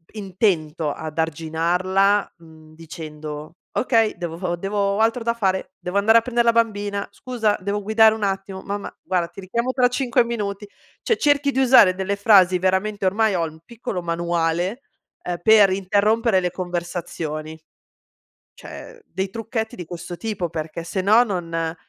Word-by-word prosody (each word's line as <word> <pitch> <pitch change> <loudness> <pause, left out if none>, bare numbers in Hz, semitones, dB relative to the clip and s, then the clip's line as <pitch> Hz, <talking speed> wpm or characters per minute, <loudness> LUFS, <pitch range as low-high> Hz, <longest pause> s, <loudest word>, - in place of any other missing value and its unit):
intento 175 -6 -1
ad 155 +1 -7
arginarla, 175 +5 +1
mhmm, 160 -2 -17
dicendo: 155 -1 -8 0.2
"Okay, 225 -4 +1
devo 175 +1 -3
devo 195 +4 -4
ho 200 0 +1
altro 225 +2 +1
da 235 0 +1
fare, 190 -6 -1
devo 180 +3 -3
andare 220 +3 +5
a - - -7
prendere 235 0 0
la - - +7
bambina, 205 -3 0
scusa 230 -5 -1
devo 200 +2 -2
guidare, 220 +1 +5
un 220 - -5
attimo 195 -1 -3
mamma 200 0 -5
guarda 180 -2 -1
ti 175 - -13
richiamo 235 +7 -2
tra 255 -1 +3
5 250 -1 +1
minuti". 205 -3 -4 0.3
Cioè 455 - +1
cerchi 285 -1 +2
di 265 - -1
usare 250 -8 +6
delle 195 +1 -2
frasi 190 -3 +5
veramente 190 +2 0
ormai 210 +3 +2
ho 170 - 0
un 160 0 -10
piccolo 220 -5 -5
manuale, 170 +5 -1 0.4
uhm, 175 -1 -3
per 210 0 +6
interrompere 200 +2 +2
le 180 -1 -1
conversazioni. 170 -3 -5 1.0
Cioè 475 -1 -11
dei 190 0 -4
trucchetti 225 +1 -4
di 175 - -7
questo 175 +1 -7
tipo 205 -3 -4
perché 160 +1 -5
se 180 +3 -3
no 215 +5 +5
non 165 -6 -3
195 Hz, 155 wpm, -22 LUFS, 170-220 Hz, 1.0 s, la